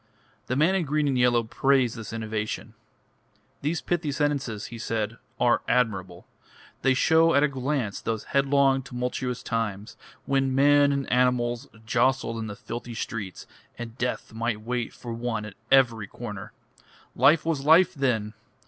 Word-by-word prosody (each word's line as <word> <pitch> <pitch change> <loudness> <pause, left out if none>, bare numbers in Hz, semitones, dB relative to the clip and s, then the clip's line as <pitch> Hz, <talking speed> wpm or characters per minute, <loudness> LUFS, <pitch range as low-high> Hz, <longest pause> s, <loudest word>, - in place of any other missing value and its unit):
The 130 - -1
man 155 +7 +3
in 190 -2 +1
green 150 +1 +1
and 135 - +1
yellow 125 -1 +3
praised 130 +1 +2
this 115 -3 -7
innovation. 110 -1 -4 0.9
"These 155 +4 -1
pithy 170 -4 -1
sentences," 140 -7 -1
he 115 - -7
said, 110 0 -3 0.2
"are 120 - +3
admirable. 95 -8 0 0.6
They 135 -1 +3
show 160 +3 +4
at 140 - +5
a - - +5
glance 135 -5 -2
those 110 -2 -2
headlong, 140 -1 +3
tumultuous 125 0 -4
times, 110 -2 -3 0.3
when 135 -1 +1
men 145 +1 +5
and 140 -1 -1
animals 125 -1 +1 0.2
jostled 120 0 +1
in 110 - -4
the 105 - -6
filthy 120 +2 -7
streets, 105 -5 -5 0.3
and 115 -1 -7
death 125 -2 -3
might 115 -1 -2
wait 120 +1 -3
for 120 -1 -8
one 115 -2 -3
at 110 - -9 0.2
every 115 -6 +4
corner. 105 -3 -8 0.6
Life 155 +3 +4
was 160 -4 -1
life 165 +5 +6
then! 115 - 0
125 Hz, 150 wpm, -26 LUFS, 115-140 Hz, 0.9 s, life